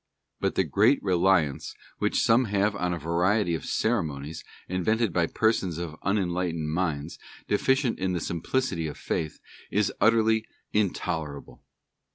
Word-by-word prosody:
But -, -, 0 dB
the -, -, +3 dB
great 110 Hz, +8 st, +4 dB
reliance 90 Hz, -6 st, +2 dB, 0.2 s
which -, -, +1 dB
some 120 Hz, +3 st, +4 dB
have 100 Hz, 0 st, +1 dB
on 90 Hz, -2 st, -1 dB
a 85 Hz, -, -1 dB
variety 85 Hz, +4 st, +1 dB
of 80 Hz, -, -3 dB
Ceremonies 80 Hz, -9 st, -1 dB, 0.2 s
invented 105 Hz, +3 st, 0 dB
by 85 Hz, -1 st, +2 dB
persons 95 Hz, -7 st, +1 dB
of 85 Hz, -2 st, -5 dB
unenlightened 90 Hz, -5 st, -1 dB
minds, 80 Hz, -3 st, -2 dB, 0.3 s
deficient 130 Hz, +4 st, +1 dB
in 95 Hz, -1 st, 0 dB
the 90 Hz, -, 0 dB
simplicity 85 Hz, +1 st, -1 dB
of 75 Hz, -, -7 dB
faith, 80 Hz, -1 st, -3 dB, 0.3 s
is 105 Hz, -1 st, +1 dB
utterly 110 Hz, -1 st, +3 dB, 0.3 s
intolerable. 85 Hz, -8 st, -2 dB
90 Hz, 135 wpm, -27 LUFS, 80-105 Hz, 0.3 s, great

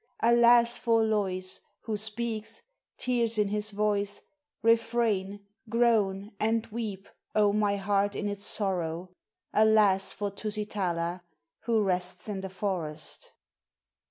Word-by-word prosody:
Alas! 235 Hz, 0 st, +5 dB
for 230 Hz, -1 st, +2 dB
Lois 190 Hz, -4 st, -2 dB, 0.2 s
who 220 Hz, -1 st, -3 dB
speaks, 220 Hz, +1 st, -4 dB, 0.3 s
tears 235 Hz, -3 st, 0 dB
in 210 Hz, -1 st, +2 dB
his 210 Hz, +1 st, 0 dB
voice, 205 Hz, -1 st, -1 dB, 0.4 s
Refrain, 225 Hz, -4 st, +1 dB, 0.2 s
groan, 215 Hz, -4 st, +1 dB
and 225 Hz, +1 st, +1 dB
weep, 210 Hz, -4 st, -5 dB, 0.3 s
oh, 210 Hz, -1 st, +4 dB
my 205 Hz, -1 st, +1 dB
heart 200 Hz, +1 st, 0 dB
in 205 Hz, -, -2 dB
its 205 Hz, 0 st, -2 dB
sorrow! 180 Hz, -4 st, +1 dB, 0.4 s
Alas! 210 Hz, -3 st, +4 dB
for 205 Hz, -1 st, -3 dB
Tusitala 195 Hz, -5 st, -3 dB, 0.4 s
who 225 Hz, -2 st, +2 dB
rests 180 Hz, 0 st, -2 dB
in 200 Hz, -2 st, -4 dB
the 190 Hz, -, -6 dB
forest. 175 Hz, -6 st, -5 dB
210 Hz, 115 wpm, -28 LUFS, 195-225 Hz, 0.4 s, Alas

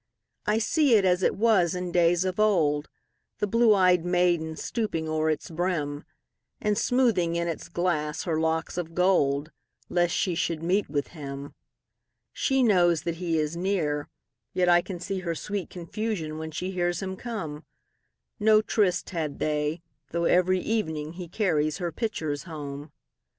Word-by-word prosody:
I 210 Hz, +1 st, +3 dB
see 270 Hz, +3 st, +3 dB
it 200 Hz, -3 st, +4 dB
as 180 Hz, 0 st, +3 dB
it -, -, +2 dB
was 200 Hz, -6 st, +3 dB
in 180 Hz, -1 st, -3 dB
days 175 Hz, +1 st, +3 dB
of 185 Hz, +2 st, -2 dB
old, 155 Hz, -9 st, +2 dB, 0.5 s
The -, -, 0 dB
blue 230 Hz, +1 st, +4 dB
ey'd 180 Hz, -2 st, +4 dB
maiden 175 Hz, -3 st, +1 dB
stooping 205 Hz, -6 st, -2 dB
o'er 155 Hz, 0 st, 0 dB
its 155 Hz, +1 st, -2 dB
brim, 160 Hz, -4 st, -2 dB, 0.5 s
And 210 Hz, 0 st, +1 dB
smoothing 230 Hz, -8 st, +2 dB
in 170 Hz, 0 st, 0 dB
its 165 Hz, 0 st, -5 dB
glass 160 Hz, -4 st, -1 dB
her 160 Hz, -3 st, -1 dB
locks 160 Hz, +2 st, -1 dB
of 165 Hz, -1 st, -6 dB
gold, 155 Hz, -5 st, +2 dB, 0.4 s
Lest 175 Hz, -1 st, +2 dB
she 185 Hz, -, +1 dB
should 165 Hz, -1 st, -1 dB
meet 190 Hz, +2 st, +1 dB
with 145 Hz, -1 st, -2 dB
him. 140 Hz, -3 st, -7 dB, 0.8 s
She 270 Hz, -2 st, +1 dB
knows 175 Hz, -7 st, +4 dB
that 170 Hz, -1 st, -3 dB
he 170 Hz, -2 st, -1 dB
is 155 Hz, +1 st, -1 dB
near, 170 Hz, -5 st, -1 dB, 0.4 s
yet 180 Hz, -1 st, +2 dB
I 175 Hz, 0 st, +6 dB
can 185 Hz, 0 st, -6 dB
seeHer 175 Hz, -2 st, -3 dB
sweet 205 Hz, +1 st, -4 dB
confusion 175 Hz, -3 st, -4 dB
when 160 Hz, 0 st, -5 dB
she 180 Hz, +4 st, -4 dB
hears 175 Hz, 0 st, -1 dB
him 190 Hz, 0 st, -4 dB
come.No 215 Hz, +2 st, -2 dB
tryst 200 Hz, -5 st, +1 dB
had 160 Hz, -5 st, -3 dB
they, 150 Hz, +2 st, -1 dB, 0.3 s
though 170 Hz, 0 st, -1 dB
every 185 Hz, +1 st, +3 dB
evening 160 Hz, -8 st, -2 dB
heCarries 170 Hz, -4 st, -1 dB
her 175 Hz, -3 st, -3 dB
pitchers 155 Hz, -, -3 dB
home. 145 Hz, -2 st, -7 dB
175 Hz, 155 wpm, -27 LUFS, 155-190 Hz, 0.8 s, I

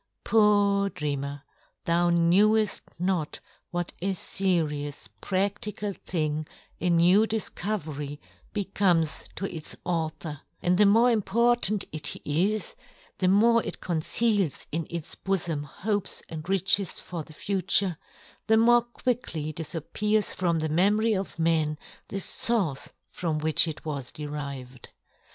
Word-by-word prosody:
Poor 205 Hz, -2 st, +4 dB
dreamer! 140 Hz, -3 st, -4 dB, 0.4 s
thou 170 Hz, +1 st, +3 dB
kneweft 200 Hz, +6 st, +3 dB, 0.2 s
not 180 Hz, -3 st, -1 dB, 0.3 s
what 175 Hz, 0 st, -3 dB
a 195 Hz, +1 st, 0 dB
ferious 155 Hz, -, -1 dB
pradlical 200 Hz, +1 st, -2 dB
thing 155 Hz, -3 st, -2 dB, 0.3 s
a 180 Hz, -, +1 dB
new 180 Hz, +6 st, +5 dB
difcovery 160 Hz, -9 st, -3 dB, 0.3 s
becomes 190 Hz, -5 st, +1 dB
to 195 Hz, -, -3 dB
its 155 Hz, -, -8 dB
author, 160 Hz, -3 st, -3 dB, 0.2 s
and 180 Hz, +1 st, +2 dB
the 210 Hz, -, +7 dB
more 230 Hz, +4 st, +5 dB
important 225 Hz, -1 st, +2 dB
it 155 Hz, -1 st, -2 dB
is, 185 Hz, +8 st, 0 dB, 0.5 s
the 185 Hz, -, +2 dB
more 230 Hz, +5 st, +5 dB
it -, -, -6 dB
conceals 185 Hz, -, 0 dB
in 165 Hz, 0 st, -2 dB
its 170 Hz, -2 st, -5 dB
bofom 170 Hz, -6 st, -2 dB
hopes 205 Hz, +7 st, -2 dB
and 160 Hz, +2 st, -7 dB
riches 195 Hz, 0 st, +2 dB
for 175 Hz, -2 st, -6 dB
the 155 Hz, -, -15 dB
future, 190 Hz, 0 st, +1 dB, 0.5 s
the 220 Hz, 0 st, +5 dB
more 240 Hz, +1 st, +6 dB
quickly 235 Hz, -10 st, -3 dB
dif 165 Hz, +1 st, -5 dB
appears, 210 Hz, +6 st, 0 dB
from 170 Hz, -3 st, +1 dB
the 155 Hz, 0 st, -1 dB
memory 210 Hz, +7 st, +3 dB
of 195 Hz, -1 st, -3 dB
men, 160 Hz, -2 st, +2 dB, 0.3 s
the -, -, -4 dB
fource 195 Hz, -, 0 dB, 0.2 s
from 165 Hz, -4 st, -3 dB
which 155 Hz, +2 st, +4 dB
it 160 Hz, -1 st, -6 dB
was 140 Hz, -5 st, -3 dB
de 150 Hz, -, -7 dB
rived. 140 Hz, -4 st, -7 dB
180 Hz, 130 wpm, -27 LUFS, 155-205 Hz, 0.5 s, the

